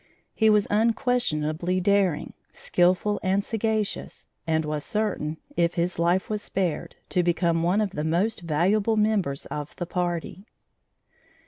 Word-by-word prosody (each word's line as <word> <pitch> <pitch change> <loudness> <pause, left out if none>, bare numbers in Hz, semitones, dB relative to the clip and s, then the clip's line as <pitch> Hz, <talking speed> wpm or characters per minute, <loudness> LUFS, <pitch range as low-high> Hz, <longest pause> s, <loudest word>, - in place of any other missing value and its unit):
He 220 -1 +3
was 210 -1 +4
unquestionably 185 - +1
daring, 190 -4 +1 0.2
skilful 185 +4 +1
and 195 +1 +1
sagacious, 220 -2 -2 0.2
and 160 -1 +1
was 150 -1 -3
certain, 200 -8 -2 0.2
if 170 0 +1
his 175 0 -1
life 175 +2 +2
was 210 -1 -2
spared, 185 -6 -2
to 180 - +2
become 170 -1 +1
one 180 +5 +2
of 205 -3 -1
the 150 - -3
most 180 +7 0
valuable 195 +7 +1
members 210 -10 +1
of 150 -1 -6
the 175 - -4
party. 175 +3 -3
180 Hz, 135 wpm, -25 LUFS, 165-210 Hz, 0.2 s, was